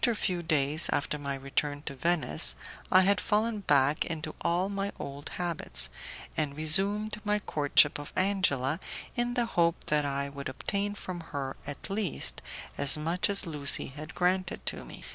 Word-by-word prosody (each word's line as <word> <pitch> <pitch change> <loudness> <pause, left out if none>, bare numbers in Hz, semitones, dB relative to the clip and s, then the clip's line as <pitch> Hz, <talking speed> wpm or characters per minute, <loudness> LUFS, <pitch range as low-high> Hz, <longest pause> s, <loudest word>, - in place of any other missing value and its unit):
A 235 - +1
few 180 -4 -2
days 155 -1 +2
after 150 +1 -1
my 140 -1 -4
return 145 +2 -3
to 140 - -5
Venice, 145 - +3 0.4
I 185 - +7
had 200 +2 +2
fallen 215 +1 0
back 145 -5 +2
into 155 -2 -5
all 175 +3 0
my 200 0 -3
old 140 +1 -7
habits, 170 - +3 0.5
and 150 -2 -2
resumed 200 +7 +4
my 210 0 +1
courtship 145 -6 +2
of 145 - -8
Angela 175 -7 +1 0.4
in 240 0 -1
the 240 - +1
hope 170 -6 +1 0.2
that 150 -1 +2
I 140 0 -2
would 140 -1 -7
obtain 200 +9 -3
from 185 -3 -6
her, 140 -5 -5
at 145 - -4
least, 195 -5 +1 0.4
as 140 +1 +5
much 170 +6 0
as 200 -1 +2
Lucie 145 -4 0
had 155 +2 -9
granted 180 0 -1
to - - -2
me. - - -12
160 Hz, 165 wpm, -29 LUFS, 145-195 Hz, 0.5 s, I